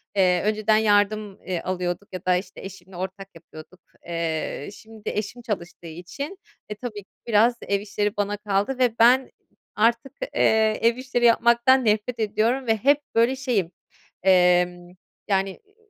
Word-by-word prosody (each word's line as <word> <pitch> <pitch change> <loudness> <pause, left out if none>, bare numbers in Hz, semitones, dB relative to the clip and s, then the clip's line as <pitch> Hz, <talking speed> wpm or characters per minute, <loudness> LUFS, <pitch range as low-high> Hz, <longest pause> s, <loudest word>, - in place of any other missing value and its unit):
Eee, 180 -2 +3
önceden 215 0 +2
yardım, 210 -1 +1
eee, 180 -3 -3
alıyorduk 180 +1 -4
ya 185 0 -7
da, 180 -1 +3
işte, 185 +1 -5
eşimle 190 -1 -11
ortak 190 +1 -6
yapıyorduk, 165 +2 -14 0.3
eee, 165 -4 -3
şimdi 220 0 -9
eşim 215 +3 -4
çalıştığı 180 -6 -6
için, 180 - -7 0.3
eee, 210 - -5
tabii 215 -5 -6
ki - - -48 0.2
biraz 230 +2 +4
ev 200 0 -1
işleri 205 0 -2
bana 205 0 -1
kaldı 205 +4 -1
ve 245 -3 +1
ben 250 +3 +5 0.4
artık, 235 +4 +1 0.2
eee, 220 -1 +3
ev 230 +1 +3
işleri 255 -1 -1
yapmaktan 235 +2 +4
nefret 215 +3 0
ediyorum 225 +4 0
ve 225 - +3
hep 280 +7 +3
böyle 235 +3 +3
şeyim, 240 -10 -1 0.5
emm, 180 -1 +3 0.4
yani, 195 -1 +1 0.2
eee, 410 0 -32
210 Hz, 150 wpm, -24 LUFS, 185-235 Hz, 0.5 s, ben